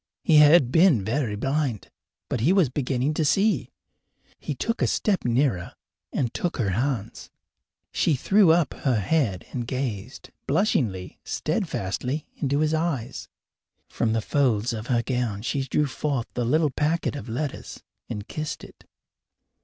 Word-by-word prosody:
He 155 - +5
had 150 -3 +7
been 160 - +4
very 115 -1 -1
blind, 135 -1 -2 0.4
but - - -2
he 135 +11 +3
was 190 -8 +4
beginning 135 +1 -1
to 155 - 0
see. 200 +8 +2 0.7
He - - -4
took 230 - -2
a - - +3
step 200 -3 0
nearer 120 -6 0 0.4
and 120 -4 -1
took 175 - -2
her 105 -6 0
hands. 115 0 -2 0.6
She 155 - +2
threw 195 +7 +4
up 165 -2 +2
her 125 -6 0
head 105 - 0
and 120 -3 -4
gazed, 125 -7 -4 0.2
blushingly, 125 - 0
steadfastly, 125 +10 -2
into 140 +1 0
his 155 0 +1
eyes. 150 -7 -2 0.6
From 110 -2 0
the 115 - +1
folds 120 -3 +1
of 110 +1 -5
her 120 -3 +1
gown 120 -6 -2
she 135 +3 -1
drew 150 +3 +1
forth 140 -3 -2
the 120 - -1
little 150 +4 +2
packet 150 +3 0
of 135 -4 -7
letters 135 +5 -5 0.3
and 105 0 -5
kissed 155 0 -5
it. - - -14
135 Hz, 150 wpm, -25 LUFS, 115-155 Hz, 0.7 s, had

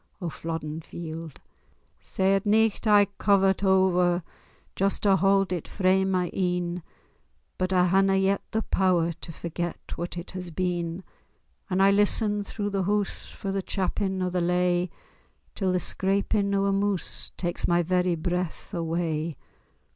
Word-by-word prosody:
O 175 -4 -4
Flodden 160 -1 -5
Field! 160 -2 -8 0.6
Sae 190 0 0
at 195 0 +1
nicht 220 +1 +2
I 205 -1 +6
cover't 195 -1 +3
o'er, 180 -2 +3 0.5
Just 195 +1 +1
to 200 -2 +5
haud 195 -1 +2
it 175 - -4
frae 190 -1 +2
my 185 -2 0
een, 180 -1 -1 0.8
But 185 0 0
I 180 -1 +4
haena 195 +2 +3
yet 195 +1 +2
the 220 0 -1
pow'r 175 -3 +1
To - - -6
forget 170 +1 -4 0.2
what 175 +1 -4
it 175 - -7
has 185 -2 -6
been; 175 0 -2 0.7
And 185 +1 +2
I 195 - +6
listen 205 +1 +2
through 205 0 -4
the 195 -2 -1
hoose 205 0 -1
For 195 - -5
the 195 0 -1
chappin 190 0 -2
o' 180 - -1
the 180 0 0
lay, 180 0 +1 0.6
Till 190 -3 0
the 180 - +1
scrapin' 200 +2 0
o' 195 0 +2
a 200 - +2
moose 200 -2 +1
Tak's 175 -1 -2
my 175 0 +3
very 180 0 +1
braith 180 +3 -3
away. 165 -2 -2
185 Hz, 155 wpm, -26 LUFS, 175-195 Hz, 0.8 s, I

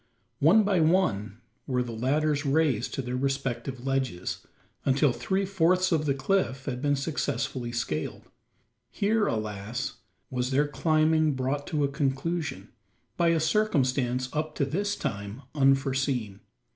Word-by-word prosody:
One 185 +10 +6
by 200 -3 +2
one 120 - +1 0.3
were 125 -2 +1
the 120 - -6
ladders 145 +6 +1
raised 140 -5 +1
to 135 - -2
their 125 0 -3
respective 135 -1 -2
ledges 130 -9 -1 0.4
until 135 0 +3
three 195 +7 -1
fourths 185 -1 +2
of 155 -2 +1
the 140 - +2
cliff 135 -3 0
had 125 -2 -3
been 145 0 +2
successfully 135 -3 -2
scaled. 100 -10 -3 0.7
Here, 205 - +1
alas! 110 0 -3 0.3
was 125 -1 -1
their 140 +2 +2
climbing 155 0 +2
brought 135 +2 -2
to 150 -3 0
a - - +3
conclusion, 140 +2 -2 0.5
by 170 - +2
a 165 -1 +3
circumstance 135 - +1
up 155 0 -2
to 140 - +1
this 200 +9 -1
time 100 +6 -5
unforeseen. 135 -6 +1
135 Hz, 135 wpm, -27 LUFS, 125-160 Hz, 0.7 s, One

